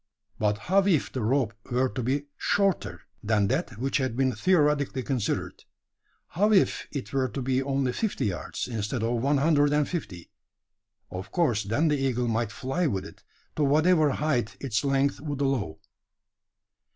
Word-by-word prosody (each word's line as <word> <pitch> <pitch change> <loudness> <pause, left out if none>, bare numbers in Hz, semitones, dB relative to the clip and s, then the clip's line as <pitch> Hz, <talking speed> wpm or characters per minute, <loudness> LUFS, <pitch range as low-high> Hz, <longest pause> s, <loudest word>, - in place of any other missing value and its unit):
But 105 -1 +1
how 190 - +2
if 165 -7 +2
the 130 - -3
rope 120 0 +1 0.2
were 125 +2 +2
to 125 +1 -4
be 135 +4 -1
shorter, 195 -3 0 0.2
than 105 -2 +1
that 135 - -1
which 135 +4 0
had 130 -3 -2
been 130 -1 +2
theoretically 150 -7 +2
considered? 125 -6 -2 0.7
How 205 +5 +2
if 195 -3 +3
it 140 -2 -6
were 135 -1 +1
to 120 +3 -5
be 130 0 0
only 135 -1 0
fifty 220 - -1
yards, 90 -6 -3
instead 115 0 -3
of 115 0 0
one 140 +3 +2
hundred 145 0 +3
and 150 -1 +2
fifty? 90 - -6 0.8
Of 90 +1 -7
course, 125 - +1
then 115 +11 +1
the 150 - +2
eagle 125 -2 0
might 115 -1 0
fly 135 +10 -1
with 95 -7 -2
it, - - -12 0.3
to 150 - +1
whatever 155 +2 +4
height 125 -8 -1
its 125 -4 -1
length 140 0 +1
would 145 -2 -4
allow. 135 - -1
135 Hz, 165 wpm, -27 LUFS, 115-150 Hz, 0.8 s, whatever